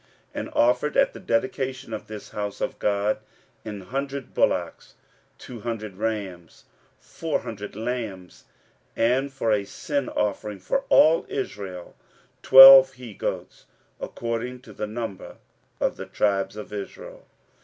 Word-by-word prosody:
15:006:017 - - -4
And - - -5
offered 125 +5 +2
at - - +3
the - - -10
dedication 130 +1 -2
of 110 - -6
this 110 -1 -9
house 105 -1 -5
of - - -3
God 105 +1 0 0.4
an 105 -2 -7
hundred 135 +5 -5
bullocks, - - -1 0.4
two 120 -2 -10
hundred 110 -3 -5
rams, 100 -6 -5 0.3
four 165 -2 -3
hundred 105 -4 -8
lambs; 110 -5 -5 0.5
and 130 +4 +1
for 135 -4 -1
a 105 -2 +2
sin 140 +6 -3
offering 105 0 -2
for 270 - -2
all 160 +1 +5
Israel, 95 -9 -6 0.5
twelve 135 0 +10
he 125 -4 -10
goats, - - -5 0.3
according 120 +2 -4
to 130 - -14
the 105 - -4
number 110 -3 -6 0.4
of - - 0
the - - -7
tribes 100 -1 0
of 105 0 -9
Israel. 100 -1 -8
115 Hz, 135 wpm, -24 LUFS, 105-130 Hz, 0.5 s, twelve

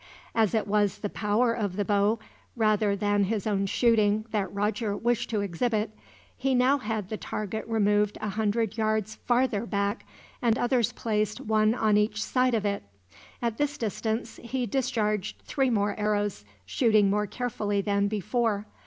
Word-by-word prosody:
As 225 -1 +2
it 220 - +1
was 205 -1 +1
the 205 - -4
power 225 +3 +1
of 205 -5 -2
the 205 0 -1
bow, 205 +2 +2 0.4
rather 215 -3 +2
than 205 0 +1
his 210 0 -2
own 200 -2 0
shooting, 215 -1 +3
that 200 -4 -1
Roger 205 +1 -1
wished 240 0 0
to 215 -3 0
exhibit, 210 +3 -1 0.4
he 265 0 0
now 260 +3 +4
had 215 -5 -3
the 215 - -3
target 215 +1 -4
removed 210 -2 +2
a 215 - -3
hundred 220 +1 -1
yards 215 -1 0
farther 240 -3 +2
back, 200 -1 -1 0.4
and 235 -1 +2
others 245 -3 +2
placed 210 -2 -1
one 215 +1 +2
on 215 -3 +3
each 210 0 +1
side 255 -1 +2
of 215 -2 -1
it. 200 0 0 0.6
At 230 -2 -1
this 290 0 0
distance 220 0 -3
he 245 +1 -2
discharged 215 -6 -1
three 270 -2 +1
more 205 -3 +1
arrows, 205 - -1 0.2
shooting 215 - +3
more 210 +1 +1
carefully 210 -4 -2
than 200 0 +1
before. 215 +1 -1
215 Hz, 160 wpm, -27 LUFS, 205-230 Hz, 0.6 s, now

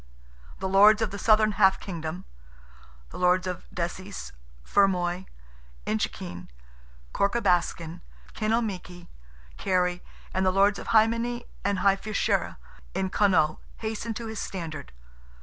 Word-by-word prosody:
The 190 - -3
Lords 210 +3 +6
of 215 - -2
the 200 - -6
southern 215 +1 +4
half 190 -1 +4
kingdom—the 60 - -10
Lords 180 +1 +3
of 180 -1 -5
Desies, 185 +3 -5 0.3
Fermoy, 185 -2 +2 0.6
Inchiquin, 90 -4 -3 0.6
Corca 200 +4 +1
Baskin, 175 -4 0 0.3
Kinalmeaky, 210 -6 -2 0.5
Kerry, 180 -1 +1 0.3
and 190 - +1
the 185 - +4
Lords 200 +2 +3
of - - -8
Hy 220 -1 +6
Many 240 +1 -2 0.2
and 200 0 +1
Hy 195 -1 +6
Fiachra, 215 +1 -1 0.4
in 190 -1 -1
Connaught, 175 -7 +3 0.2
hastened 220 0 -4
to 235 - -5
his 220 -1 -5
standard. 165 - -6
190 Hz, 120 wpm, -27 LUFS, 175-210 Hz, 0.6 s, Lords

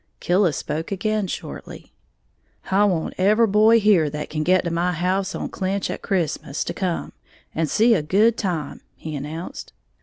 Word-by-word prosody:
Killis 175 -4 +2
spoke 155 +4 -4
again 210 +1 -1
shortly. - - -8 0.8
"I 200 +2 +4
want 175 -6 0
every 210 +5 +4
boy 220 +2 +5
here 195 -8 +4
that 150 +1 -6
can 155 - -2
get 185 +4 +3
to 170 - -2
my 175 +2 0
house 185 +3 -1
on - - -4
Clinch 195 +1 -2
a - - -5
Christmas 165 -7 -2
to - - -4
come, 185 -3 -3 0.4
and 160 -1 -1
see 230 - +4
a 190 - +2
good 205 +9 +3
time," 170 -10 -3
he 155 -1 -7
announced. 150 +5 -7
185 Hz, 170 wpm, -22 LUFS, 160-205 Hz, 0.8 s, boy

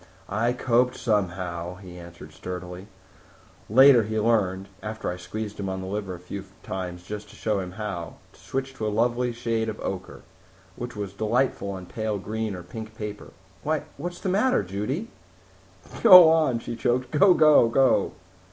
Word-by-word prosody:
"I 115 +4 +1
coped 125 0 +2
somehow," 90 -5 -2
he 90 -2 -11
answered 85 0 -12
sturdily. 90 +1 -7 0.8
"Later 130 +2 +7
he 110 0 -2
learned 100 -4 +1
after 110 -3 -4
I - - -4
squeezed 105 +4 -6
him 100 -1 -3
on 95 0 -3
the 95 - -6
liver 95 -1 -4
a - - -11
few 95 +2 -7 0.2
times 90 -2 -5
just 105 +2 -7
to - - -15
show 105 -2 -1
him 90 -1 -6
how 95 -5 -5 0.2
to - - -21
switch 135 0 -4
to 110 -5 -3
a - - +1
lovely 120 +3 +1
shade 115 -1 -2
of 110 - -6
ochre, 95 -1 -5 0.5
which 120 -1 -6
was 100 -2 -5
delightful 110 +1 0
on 95 -1 -7
pale 110 +2 -3
green 110 +1 -3
or 90 - -8
pink 110 +2 -9
paper. 105 -1 -6 0.3
Why, - - -1
what's 175 +4 -5
the - - -4
matter, 205 - +2
Judy?" 105 - -3 0.9
"Go 180 -7 +10
on," 155 -7 +3
she 115 0 -6
choked. 125 +2 0
"Go 180 +4 +5
go 150 -6 +6
go!" 130 +1 +3
105 Hz, 170 wpm, -25 LUFS, 95-120 Hz, 0.9 s, Go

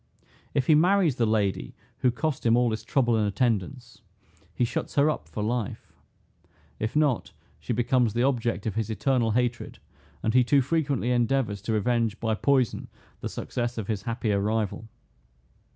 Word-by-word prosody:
If 135 - +2
he 155 - +5
marries 175 -2 +3
the 115 - +2
lady 105 -3 0 0.2
who 125 - +3
cost 140 +4 -2
him 115 0 +4
all 120 -1 +3
this 110 -1 -3
trouble 120 -1 +2
and 105 -2 +1
attendance, 115 +2 -2 0.5
he 120 - +2
shuts - - -4
her 145 +2 +4
up - - -6
for 105 - -4
life: 115 -1 -3 0.9
If 110 +5 -3
not, 150 -6 +1 0.3
she - - -5
becomes 120 -1 +1
the 120 - +2
object 120 -5 0
of 110 - -1
his 110 -1 -2
eternal 120 +1 +1
hatred, 120 +2 -1 0.5
and 110 - +1
he 125 0 +5
too 135 +2 +3
frequently 140 -4 0
endeavors 120 -4 +1
to 110 +2 -2
revenge 115 0 0
by 110 -1 0
poison 130 +1 +1 0.3
the - - -4
success 120 -1 -4
of 110 - -3
his 105 -1 -2
happier 110 -2 -1
rival. 110 +1 -2
120 Hz, 170 wpm, -26 LUFS, 110-130 Hz, 0.9 s, he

